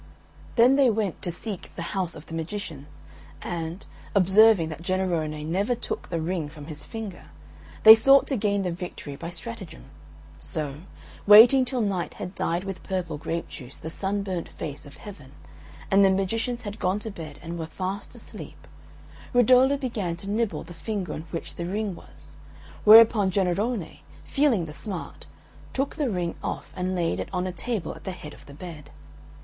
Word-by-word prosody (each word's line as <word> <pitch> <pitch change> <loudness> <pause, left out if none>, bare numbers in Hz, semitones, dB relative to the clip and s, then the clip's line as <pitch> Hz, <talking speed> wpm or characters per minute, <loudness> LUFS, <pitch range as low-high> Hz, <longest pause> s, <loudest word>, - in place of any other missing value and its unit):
Then 250 +3 +6
they 270 -3 +5
went 210 -5 -1
to - - -2
seek 195 +2 -6
the 170 - -4
house 185 -4 -1
of 155 - -11
the - - -11
magicians, 165 -3 -6 0.4
and, 170 +2 -5 0.3
observing 195 -2 +6
that 155 0 -7
Jennarone 170 -5 -1
never 195 +9 0
took 235 - -5
the 170 - -2
ring 160 -2 -2
from 150 -1 -11
his 150 -1 -5
finger, 215 -3 -7 0.6
they 220 - +13
sought 270 +5 +6
to 275 - 0
gain 200 -3 0
the 180 - -1
victory 170 -4 -7
by 165 +4 -6
stratagem. 175 - -8 0.5
So, 145 -3 -4 0.5
waiting 235 +6 +9
till 250 -1 -1
Night 195 -5 -2
had 180 - -6
dyed 170 -1 -1
with 195 -3 -6
purple 175 -5 -3
grape 165 +2 -3
juice 130 -1 -9
the 160 - -6
sunburnt 190 -2 -2
face 145 -1 -6
of 145 - -14
Heaven, 170 -11 -11 0.6
and 195 +1 +6
the 195 - +6
magicians 225 +6 -1
had 210 0 -6
gone 185 +2 +1
to 215 +1 -5
bed 155 -6 -9
and 170 0 -5
were 160 - -4
fast 190 +4 -5
asleep, - - -11 0.7
Rudolo 255 +3 +5
began 215 -10 -2
to 195 +4 -5
nibble 210 -8 -1
the 175 - -11
finger 195 +2 -4
on 160 +2 -7
which 165 - -5
the 170 - -3
ring 205 +1 -2
was, - - -13 0.5
whereupon 215 -2 +8
Jennarone, 195 +2 -1 0.2
feeling 270 - +2
the 150 - -8
smart, 195 +3 -7 0.5
took 270 +1 -1
the 290 -5 0
ring 175 -4 -2
off - - -5
and 185 +1 -2
laid 165 - 0
it 95 - -4
on 180 0 -1
a 185 - -2
table 195 +2 -3
at - - -13
the 190 - -4
head 155 -4 -10
of - - -16
the 140 - -12
bed. 150 -3 -9
185 Hz, 175 wpm, -26 LUFS, 165-215 Hz, 0.7 s, they